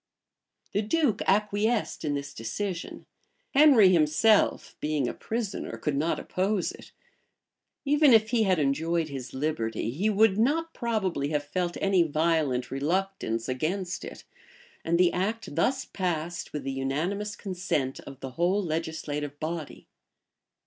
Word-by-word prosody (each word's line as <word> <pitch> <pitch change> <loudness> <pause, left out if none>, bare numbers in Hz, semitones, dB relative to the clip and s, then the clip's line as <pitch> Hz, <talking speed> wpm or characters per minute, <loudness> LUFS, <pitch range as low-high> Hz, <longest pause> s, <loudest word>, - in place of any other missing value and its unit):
[] - - -44
The 205 - +2
duke 230 0 +1
acquiesced 210 +3 +1
in 145 -2 0
this 140 0 -5
decision: 175 - -5 0.5
Henry 270 -9 +7
himself, 175 +6 +3
being 150 -4 0
a - - -3
prisoner, 225 -3 -4
could 150 -2 -2
not 155 +4 0
oppose 190 +1 -1
it: - - -13 0.9
even 295 0 +5
if 220 -1 +5
he 240 -2 +3
had 190 -4 +3
enjoyed 160 +3 0
his 130 -3 -7
liberty, 115 -6 -2
he 185 - 0
would 215 -1 +3
not 325 +8 +1
probably 205 - -1
have 150 -1 0
felt 175 +4 -2
any 195 -2 +3
violent 155 -5 +1
reluctance 150 -5 -1
against 175 +8 -2
it: - - -9 0.6
and 170 +1 +1
the 180 0 +4
act 210 +1 -2
thus 260 - +1
passed 175 -3 -3
with 150 -2 -4
the 135 - -3
unanimous 165 +11 -2
consent 175 -8 -2
of 135 -1 -11
the 135 - -6
whole 180 +8 +1
legislative 155 -3 -3
body. 160 -1 -5
175 Hz, 140 wpm, -27 LUFS, 145-205 Hz, 0.9 s, Henry